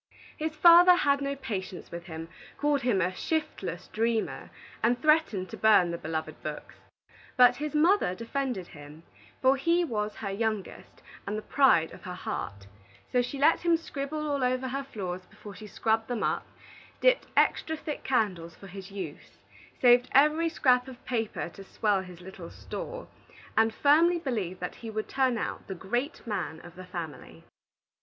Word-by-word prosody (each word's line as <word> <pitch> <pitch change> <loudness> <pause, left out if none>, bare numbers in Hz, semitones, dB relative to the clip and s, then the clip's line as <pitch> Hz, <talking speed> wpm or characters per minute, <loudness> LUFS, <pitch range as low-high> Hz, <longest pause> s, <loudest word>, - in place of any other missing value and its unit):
His 315 0 -3
father 345 +3 +8
had 280 -5 +2
no 280 0 -2
patience 200 -9 -6
with 170 0 -7
him, 165 -2 -7 0.3
called 290 -1 +1
him 240 -6 +1
a 180 +1 0
shiftless 250 - -3
dreamer, 225 0 -1 0.3
and 240 +1 +2
threatened 305 -12 +2
to - - -7
burn 210 -5 +5
the 170 - -3
beloved 155 -1 -4
books. 150 -1 -6 0.6
But 250 -1 +7
his 300 +2 -4
mother 320 - +3
defended 230 -3 -3
him, 150 +1 -12 0.4
for 260 +1 +6
he 340 +5 +2
was 215 -8 -2
her 200 -2 -4
youngest 215 -1 -4 0.2
and 205 +2 -2
the 215 - -5
pride 215 - +4
of - - -12
her 180 -1 -7
heart; 100 - -5 0.5
so 250 - +3
she 250 +3 -4
let 295 +4 +4
him 340 -1 +3
scribble 305 -1 -4
all 285 -2 0
over 255 +1 0
her 275 +2 -3
floors 185 -7 -6
before 205 - -12
she 215 +2 -10
scrubbed 220 +2 0
them 245 -3 -2
up, - - -1 0.5
dipped - - +3
extra 320 0 +2
thick 300 -1 -6
candles 185 -10 0
for - - -14
his 195 0 -9
use, 195 -1 -8 0.4
saved 245 0 +6
every 305 +4 +4
scrap 255 -5 +3
of 255 -2 -12
paper 225 -7 -2
to 195 +3 -12
swell 200 0 0
his 180 -2 -11
little 180 -2 -10
store, - - -7 0.5
and 225 0 +4
firmly 315 +8 +4
believed 215 - -3
that 180 - -5
he 230 - -6
would 215 0 -3
turn 260 -3 +1
out - - -4
the 190 - -5
great 240 - -3
man 185 -7 -3
of 175 -1 -13
the 185 0 -9
family. 160 - -8
230 Hz, 170 wpm, -28 LUFS, 185-280 Hz, 0.6 s, father